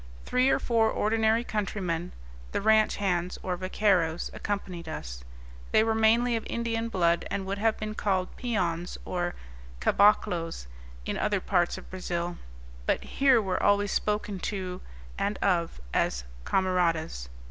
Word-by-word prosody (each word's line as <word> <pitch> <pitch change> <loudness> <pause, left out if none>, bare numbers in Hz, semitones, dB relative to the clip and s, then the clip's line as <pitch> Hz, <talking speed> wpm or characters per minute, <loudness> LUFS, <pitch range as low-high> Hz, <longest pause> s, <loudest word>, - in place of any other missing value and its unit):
Three 255 +1 +3
or - - +4
four 225 -2 +2
ordinary 220 +1 +2
countrymen, 185 -6 -2 0.4
the - - +1
ranch 220 +1 +4
hands, 180 -3 -1
or 180 -1 -1
vaqueiros, 185 -3 +1
accompanied 180 -5 -4
us; - - -6 0.5
they 215 - +5
were 225 0 +1
mainly 230 +2 +3
of 225 - -2
Indian 230 -1 -1
blood, 170 -4 +2
and 195 - -2
would 200 +1 -3
have 220 +1 +2
been 215 0 -4
called 190 -3 -1
peons, 180 -8 -2
or 175 -1 -2 0.4
caboclos, 175 - +2 0.4
in - - -2
other 205 -2 +1
parts 175 -2 +1
of - - -12
Brazil, 175 -2 -3 0.5
but - - +1
here 270 -3 +4
were 190 -4 -1
always 205 0 +3
spoken 210 -2 -1
to 185 -2 -4 0.4
and 200 0 0
of 170 - 0
as 60 +1 +1 0.2
"camaradas." 170 - 0
195 Hz, 140 wpm, -28 LUFS, 175-220 Hz, 0.5 s, they